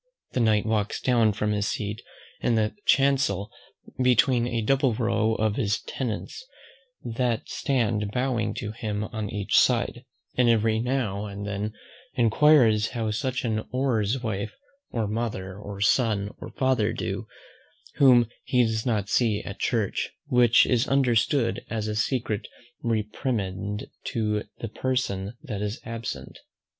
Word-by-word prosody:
The - - -1
Knight 110 -3 +3
walks 110 -2 0
down 115 -4 +3
from 105 +1 -1
his 105 -1 0
seat 105 0 -3 0.4
in 120 - +2
the 110 -1 +1
chancel 135 -8 +3 0.5
between 125 -1 +4
a 115 -2 -1
double 130 0 +2
row 110 -1 +1
of 110 -1 0
his 105 -6 +1
tenants, 130 - -5 0.6
that 120 -1 -1
stand 115 -6 0
bowing 125 -1 0
to 105 - -4
him 110 -2 -3
on 110 -1 -4
each 100 -2 +2
side; 120 0 +1 0.3
and 125 -1 +4
every 110 -1 +3
now 115 -5 -1
and 100 0 -6
then 105 +1 -3 0.4
enquires 115 -2 +5
how 115 -3 -2
such 125 +3 -2
an 110 -2 0
one's 125 -2 0
wife, 100 - -3 0.3
or 115 -3 -1
mother, 105 -4 -3
or 100 -1 -8
son, 105 -2 +2
or - - -7
father 130 -5 +1
do, - - -4 0.7
whom 125 -4 +6 0.2
he 125 -3 +3
does 110 +1 -1
not 105 -5 0
see 110 -2 +1
at 100 - -7
church; 110 -5 0 0.2
which 125 -4 +5
is 125 -2 +2
understood 125 -2 +2
as 110 -1 -2
a 105 - -2
secret 110 -1 -1 0.3
reprimand 105 -3 -2 0.2
to 105 -2 -1 0.2
the 115 - -3
person 115 -4 -2
that 110 -9 -4
is 105 +3 -3
absent. 115 - -6
110 Hz, 140 wpm, -26 LUFS, 105-125 Hz, 0.7 s, whom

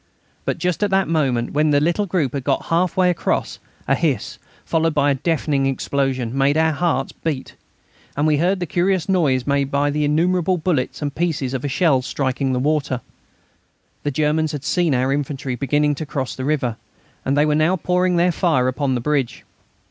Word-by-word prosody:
But - - -1
just 180 0 -1
at 205 - +2
the 195 0 +2
moment 135 -7 0
when 150 +1 +2
the 145 -1 +4
little 175 +7 0
group 165 -8 0
had 140 -2 -3
got - - 0
half 180 +2 +1
way 180 -1 +4
across, 175 - -2 0.3
a 135 - +3
hiss, 140 -3 -1 0.3
followed 165 -1 +1
by 145 -1 +3
a - - +3
deafening 140 -1 0
explosion, 135 -2 -1
made 140 +2 +2
our 160 0 +3
hearts 155 -3 -1
beat, 145 -5 -4 0.6
and 145 - +1
we 155 -1 +3
heard 185 +5 +1
the 175 - -2
curious 180 +2 0
noise 150 -10 +2
made 140 -1 +1
by 145 +1 +1
innumerable 165 +5 +1
bullets 155 -4 -1
and 145 -1 -2
pieces 150 -6 -1
of 135 +2 -2
shell 145 -5 +3
striking 135 0 -1
the 130 - 0
water. 140 -2 0 1.0
The 145 - -1
Germans 155 +2 0
had 145 -2 -5
seen 175 -6 +1
our 130 +2 +1
infantry 140 -2 -3
beginning 145 +4 +1
to 155 +2 -5
cross 135 -3 -3
the 130 - -5
river, 130 -6 0 0.5
and 135 +2 0
they 145 - +4
were 150 - +2
now 155 +4 +3
pouring 180 +1 +1
their 175 +1 +3
fire 160 -8 +1
upon 130 0 0
the 120 - -2
bridge. 140 -2 -1
150 Hz, 190 wpm, -21 LUFS, 135-165 Hz, 1.0 s, the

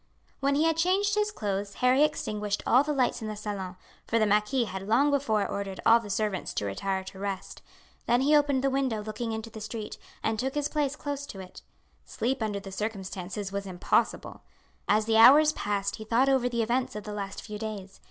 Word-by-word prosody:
When 280 +1 +1
he 300 - +3
had 325 -1 +2
changed 380 +4 +2
his 420 0 +1
clothes 200 - -3
Harry 255 +2 +3
extinguished 210 -8 -1
all 255 - +5
the 300 - -2
lights 260 -5 +1
in 220 - -4
the 215 - -4
salon, 200 -3 -5 0.3
for 230 - +1
the 220 - +3
marquis 210 +5 +2
had 190 -2 -6
long 275 +7 +4
before 230 -8 +1
ordered 195 -1 -4
all 230 +1 +7
the 215 -3 -9
servants 205 -1 -2
to - - -1
retire 190 - -2
to 190 0 -10
rest. 195 -1 -5 0.5
Then 240 +1 +3
he 295 +3 +4
opened 285 -3 +3
the 275 - +2
window 260 -6 0
looking 220 +2 -4
into 220 +1 -5
the 220 - -9
street 220 0 -6 0.2
and 220 -1 0
took 265 +3 -2
his 295 0 0
place 295 -2 -1
close 285 -1 -5
to 195 - -9
it. 185 -1 -10 0.4
Sleep 255 +2 -2
under 210 -2 -1
the 195 0 -9
circumstances 195 -1 -4
was 200 0 -4
impossible. 180 -1 0 0.5
As 215 +1 +3
the 220 0 +2
hours 290 +7 +8
passed 200 -5 -2
he 220 - -7
thought 235 +5 +2
over 260 -2 +2
the 235 -1 0
events 245 +2 -1
of 210 - -5
the 210 - -6
last 200 -1 -5
few 210 -1 -7
days. 205 -3 -6
220 Hz, 210 wpm, -28 LUFS, 200-265 Hz, 0.5 s, hours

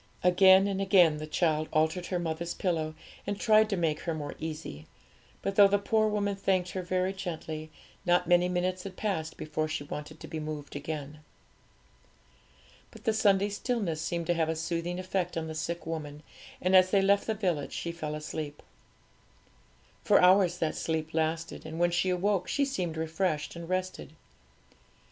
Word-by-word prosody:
Again 190 +1 +6
and 195 -1 -1
again 180 -6 +5
the 155 0 -6
child 155 -1 0
altered 160 +3 +1
her 180 - -1
mother's 170 0 -3
pillow, 160 -4 -1 0.3
and 205 0 -2
tried 215 -1 +4
to 200 - 0
make 160 -3 0
her 165 -2 -3
more 145 -2 -5
easy; 155 - -6 0.6
but 195 - -1
though 200 -1 +9
the 200 +1 +3
poor 215 +2 +2
woman 205 -1 0
thanked 185 -2 0
her 185 - -3
very 185 +1 -1
gently, 160 -4 -5 0.3
not 180 -1 +3
many 175 0 +4
minutes 180 +1 -1
had 185 0 -8
passed 165 -7 -2
before 155 0 -2
she 155 -2 -3
wanted 150 +2 -7
to - - -9
be 160 - -5
moved 150 -2 -6
again. 150 0 -5 1.7
But - - -15
the 225 -3 +2
Sunday 205 -2 +3
stillness 205 -7 -2
seemed 170 +1 -2
to 175 - +2
have 165 -1 0
a 160 - 0
soothing 170 +2 -3
effect 185 -2 -2
on 160 - -2
the 160 - -5
sick 170 +2 -4
woman; 150 -2 -5 0.4
and 185 +1 +2
as 185 0 +7
they 195 0 +3
left 200 +1 +3
the 220 - 0
village 180 -8 -1
she 170 - -3
fell 155 -3 -5
asleep. 150 -1 -6 1.4
For - - +5
hours 180 -1 +5
that 160 -3 0
sleep 160 -1 -2
lasted, 160 +1 -1
and 160 +1 -7
when 175 0 +3
she 180 +2 +1
awoke 185 +1 +1
she 285 - +1
seemed 180 -12 -3
refreshed 160 -1 -1
and 170 0 -8
rested. 185 -4 -3
175 Hz, 175 wpm, -29 LUFS, 155-190 Hz, 1.7 s, though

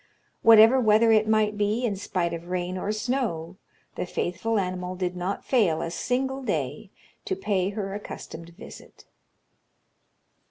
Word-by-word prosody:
Whatever 225 +3 +7
weather 225 -1 +4
it 215 -1 +4
might 215 -1 +1
be, 210 +4 +1
in 210 -4 -1
spite 180 -3 -2
of 170 +1 -7
rain 180 0 -3
or 195 +3 -2
snow, 215 -7 -2 0.4
the - - -4
faithful 185 +6 -2
animal 185 -1 -3
did 180 -1 -3
not 180 +3 -4
fail 205 -12 +2
a 165 - -3
single 265 +7 -2
day 260 - -3 0.4
to 380 - -1
pay 195 - 0
her 200 -1 -4
accustomed 170 -4 -8
visit. - - -13
205 Hz, 145 wpm, -26 LUFS, 180-225 Hz, 0.4 s, Whatever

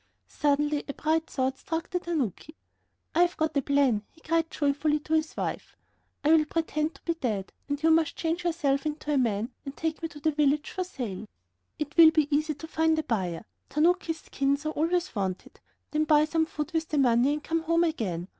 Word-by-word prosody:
Suddenly 295 0 +1
a 280 - -5
bright 320 +1 0
thought 265 0 -1
struck 325 0 -4
the 360 - 0
tanuki. 310 - -3 0.6
"I 335 - +3
have 350 0 +2
got 315 -1 0
a 280 - +3
plan," 275 -6 +2
he - - -24
cried 325 0 0
joyfully 295 +1 +1
to 310 - -4
his 315 0 0
wife. - - -4 0.5
"I 295 - +2
will 320 -1 +5
pretend 310 0 -1
to - - -18
be 335 - 0
dead, 220 - -3 0.2
and 285 +1 -2
you 325 - +5
must 320 -2 +3
change 335 +1 -2
yourself 310 -5 0
into 300 0 -3
a - - +3
man, 225 -1 0
and 275 0 -8
take 320 -1 -2
me 325 - -3
to 295 - -11
the 315 +2 +1
village 295 0 +1
for 370 - -2
sale. 225 - -6 0.5
It 295 -1 -5
will 330 -1 +10
be 305 -2 +2
easy 305 +1 0
to 320 +3 -9
find 320 0 +2
a 315 - 0
buyer, 190 - -2 0.2
tanukis' 325 +2 +1
skins 280 +2 -1
are - - +1
always 345 +4 0
wanted; 190 -3 -4 0.3
then 305 0 +1
buy 300 0 +5
some 320 +1 0
food 305 0 -4
with 325 -1 0
the 305 - -1
money 255 +1 +4
and 300 0 -4
come 330 0 -1
home 335 +1 +2
again. 195 - -2
305 Hz, 210 wpm, -28 LUFS, 280-320 Hz, 0.6 s, will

